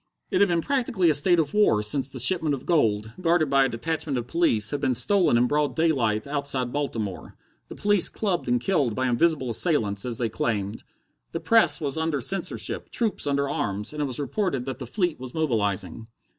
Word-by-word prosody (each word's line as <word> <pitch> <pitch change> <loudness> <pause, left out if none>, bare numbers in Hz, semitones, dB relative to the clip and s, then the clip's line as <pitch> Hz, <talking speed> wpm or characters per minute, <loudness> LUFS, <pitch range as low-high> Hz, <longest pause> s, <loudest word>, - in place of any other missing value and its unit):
It - - +1
had 200 - +5
been 170 -2 0
practically 235 - +1
a - - +1
state 175 +5 +4
of 155 -3 -1
war 205 - +3
since 135 +5 +1
the 135 - -9
shipment 150 +3 +5
of 130 - -11
gold, 110 -10 +1
guarded 165 -4 +1
by 135 -1 +4
a - - -1
detachment 150 +3 -3
of 120 - -3
police, 125 -9 +1
had 145 -1 -3
been 130 -3 0
stolen 190 - +2
in 120 - +3
broad 145 +3 0
daylight 125 -10 0
outside 140 -3 -1
Baltimore, 115 -9 -4 0.3
the - - -10
police 205 -3 +3
clubbed 190 - -2
and 120 0 +1
killed 135 - 0
by 130 - -1
invisible 130 0 +1
assailants 110 - 0
as 120 -3 -2
they 120 - -1
claimed. 105 -1 -3 0.5
The 165 - -2
press 170 -10 +3
was 145 0 -3
under 160 -3 -1
censorship, 190 +11 -3
troops 220 -10 -1
under 140 0 0
arms, 105 -2 -3
and 150 - -4
it - - 0
was 130 -1 -4
reported 145 - -2
that 130 -1 -6
the 125 - -7
fleet 175 - -2
was 125 -1 -9
mobilizing. 110 - -2
140 Hz, 200 wpm, -24 LUFS, 120-165 Hz, 0.5 s, had